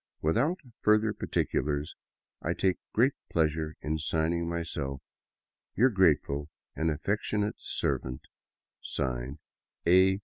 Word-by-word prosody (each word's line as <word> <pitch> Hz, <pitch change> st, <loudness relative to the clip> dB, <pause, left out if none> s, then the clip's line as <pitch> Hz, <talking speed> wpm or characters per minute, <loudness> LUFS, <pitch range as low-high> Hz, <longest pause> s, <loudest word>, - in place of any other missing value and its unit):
Without 125 Hz, -, +2 dB, 0.2 s
further 105 Hz, 0 st, +4 dB
particulars, 75 Hz, -6 st, -1 dB, 0.5 s
etc., -, -, -1 dB
I -, -, -4 dB
take 95 Hz, -1 st, +3 dB
great 130 Hz, +5 st, +4 dB, 0.2 s
pleasure 80 Hz, -1 st, +1 dB
in 80 Hz, +1 st, -1 dB
signing 80 Hz, +2 st, 0 dB
myself 75 Hz, -5 st, -3 dB, 0.8 s
Your 130 Hz, +3 st, +5 dB
grateful 75 Hz, -6 st, +2 dB, 0.3 s
and 80 Hz, +1 st, +1 dB
affectionate 105 Hz, +6 st, -1 dB
servant, 65 Hz, 0 st, -2 dB, 0.6 s
(Signed) 65 Hz, 0 st, -3 dB, 0.5 s
A. 95 Hz, +2 st, +5 dB
80 Hz, 105 wpm, -30 LUFS, 75-105 Hz, 0.8 s, Your